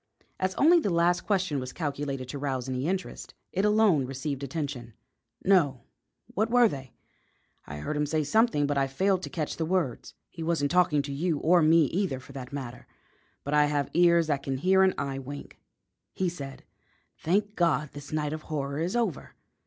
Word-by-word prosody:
As 185 0 -1
only 340 +4 +6
the 210 - -1
last 175 +1 +2
question 185 -8 +1
was 130 0 -5
calculated 140 -4 -3
to 140 - -5
rouse 135 -3 -2
any 130 +2 -2
interest, 190 +1 -4 0.2
it 195 - 0
alone 210 -10 +3
received 135 +1 -4
attention. 135 -5 -5 0.5
"No; 150 -10 +3 0.5
what 215 +3 0
were 245 0 +6
they? 135 - -7 0.7
I 75 - -7
heard 75 - -4
him 150 0 0
say 155 +1 0
something, 220 - +2
but 145 -1 0
I 135 - +1
failed 185 +7 +1
to - - -6
catch 155 -3 -3
the 165 - -1
words." 170 -8 -2
"He 165 - -10
wasn't 160 -3 0
talking 170 -5 +3
to 140 0 -5
you, 160 +2 0
or 170 +4 +4
to 155 - +4
me 165 0 +6
either, 175 -4 -1
for 130 - -14
that 130 -2 -8
matter; 130 -3 -7 0.6
but 145 - -3
I 150 0 +5
have 145 -1 -1
ears 170 0 +5
that 145 -3 -1
can 135 -1 -3
hear 190 +6 +3
an 190 0 +4
eye 135 -1 -3
wink. 140 +2 -9 0.5
He 185 -1 0
said: 140 -6 -8 0.6
'Thank 205 +5 0
God, 160 -4 +1
this 145 -1 -10
night 150 -1 -1
of 155 - -5
horror 140 -2 -2
is 175 +7 -1
over!' 225 - -2
150 Hz, 190 wpm, -28 LUFS, 140-180 Hz, 0.7 s, only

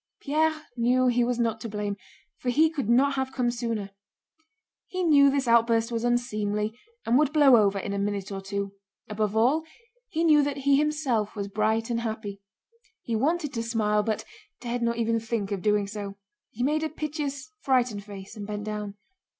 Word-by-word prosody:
Pierre 310 +2 0
knew 250 +2 +2
he 245 0 +2
was 245 0 0
not 225 -2 0
to 230 - -5
blame, 205 -1 -3 0.4
for 250 - -2
he 310 +6 +4
could 275 -9 -3
not 270 +4 +4
have 265 -1 -2
come 250 -2 0
sooner; 230 -4 -3 1.0
he 370 0 -3
knew 285 -4 +6
this 275 -2 0
outburst 230 0 +3
was 230 0 -2
unseemly 215 -3 0 0.3
and 245 +4 +4
would 300 -2 +2
blow 290 -4 +6
over 200 -3 +3
in 200 +1 -3
a 200 - -2
minute 200 0 -2
or 195 -1 -4
two; 200 0 -3 0.4
above 210 0 -1
all 265 +8 +3 0.5
he 330 -3 -1
knew 305 -3 +6
that 285 0 -1
he 280 0 +3
himself 275 -8 0
was 200 -1 -3
bright 220 +3 0
and 230 - 0
happy. 220 -3 -5 0.6
He 230 - -2
wanted 295 +4 0
to 230 - -2
smile 215 -2 +1
but 215 +1 -2 0.3
dared 240 0 -3
not 235 0 0
even 230 0 +1
think 220 -3 -3
of 200 -2 -2
doing 210 0 +2
so. 200 -1 -6 0.3
He 245 - -4
made 300 +3 +1
a 315 - -1
piteous, 300 -1 -4
frightened 245 -7 +1
face 195 0 -10
and 205 -2 -7
bent 210 -1 -4
down. 210 -1 -5
230 Hz, 190 wpm, -27 LUFS, 210-275 Hz, 1.0 s, knew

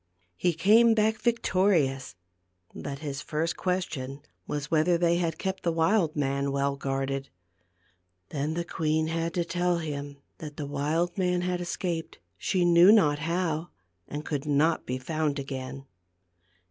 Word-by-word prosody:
He 175 - +1
came 220 +7 +5
back 220 0 +2
victorious; 185 - +1 0.6
but 140 -1 -6
his 140 -1 -4
first 160 +2 -2
ques 185 0 0
tion 135 0 -6 0.3
was 145 +1 -4
whether 165 +2 +3
they 170 0 +2
had 170 -2 -1
kept 190 -1 -3
the 170 - +1
wild 165 0 +2
man 140 -1 0
well 140 0 0
guarded. 135 0 -2 1.0
Then 150 +2 -2
the 170 0 -2
queen 160 -1 0
had 165 0 -1
to 175 -1 0
tell 175 0 0
him 145 -3 -5 0.2
that 150 -2 -8
the 150 - -3
wild 150 +6 -1
man 180 -1 +1
had 180 0 -1
es 175 - -3
caped, 170 -3 -3 0.2
she 180 - 0
knew 175 +3 +7
not 150 -10 +4
how, 165 0 -1 0.4
and 150 +1 -6
could 145 -1 -3
not 150 +3 +2
be 125 - -1
found 150 +2 -1
again. 135 0 -6
160 Hz, 155 wpm, -28 LUFS, 140-175 Hz, 1.0 s, knew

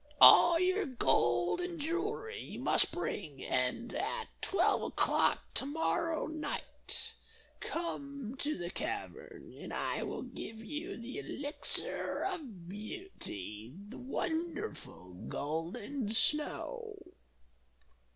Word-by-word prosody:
All 340 -1 +10
your 370 +2 +3
gold 175 - +3
and 355 -2 -3
jewelry 405 +9 -1
you - - -7
must - - +5
bring, 140 -4 -3
and, 125 - +1
at - - -1
twelve 395 - +3
o'clock - - +2
to 270 - -1
morrow 320 +2 +1
night, 315 0 -3 0.5
come 280 -7 -4
to 300 +1 0
the 175 0 -3
cavern, - - -5
and - - -8
I - - -1
will - - -3
give 220 - -7
you 300 - -5
the 235 +3 -5
Elixir 290 +2 0
of 265 - -4
Beauty, 175 - -6
the 235 - -8
wonderful 320 - -3 0.2
golden 180 - -2
snow." 420 - +1
285 Hz, 105 wpm, -34 LUFS, -, 0.5 s, All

